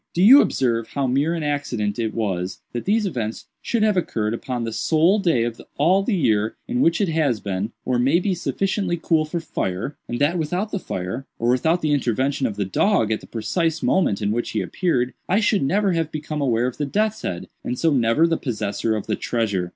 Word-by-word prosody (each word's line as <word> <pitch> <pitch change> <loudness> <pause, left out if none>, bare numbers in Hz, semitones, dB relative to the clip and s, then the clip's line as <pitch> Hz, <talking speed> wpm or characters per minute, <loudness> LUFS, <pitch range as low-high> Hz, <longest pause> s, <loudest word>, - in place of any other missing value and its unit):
Do 175 - +3
you 265 +8 +9
observe 115 -3 0
how 140 -1 -2
mere 140 +6 +1
an 165 - -3
accident 125 -8 -2
it 110 -2 -2
was 95 -5 -2
that 120 - -4
these 210 +2 +2
events 120 - -3 0.2
should 230 -3 0
have 215 -2 +3
occurred 110 -11 -1
upon 120 0 -3
the 115 -1 -3
sole 165 - +3
day 165 - +2
of 115 -1 -4 0.2
all 180 +7 +4
the 205 +1 0
year 110 - +1
in 250 +1 0
which 165 - +3
it 200 -4 +1
has 150 -8 +1
been, 100 +2 -3
or 125 -1 +1
may 135 +7 +3
be, 190 +1 0
sufficiently 190 0 -1
cool 160 -1 +2
for 160 +3 -3
fire, 115 - -3
and 120 - -3
that 160 +5 +2
without 180 +7 -2
the 200 - -2
fire, 105 - -5
or 115 - 0
without 160 +8 +1
the 155 - +1
intervention 135 +1 0
of 105 - -5
the 100 -1 -1
dog 115 - +2
at 110 - -1
the - - -13
precise 160 - -1
moment 110 - +2
in 100 - +1
which 120 +2 -1
he - - -1
appeared, 130 -9 0 0.2
I 195 - +3
should 210 -2 +2
never 195 +8 +2
have 165 -2 -1
become 150 0 -4
aware 120 -3 +1
of 125 - -3
the 145 - -2
death's 215 +7 0
head, 85 - -4 0.2
and 125 - -3
so 165 +3 +2
never 120 +4 +3
the 165 -1 +1
possessor 110 -2 -2
of 105 - -4
the - - -1
treasure?" 100 -7 -1
140 Hz, 220 wpm, -22 LUFS, 115-175 Hz, 0.2 s, you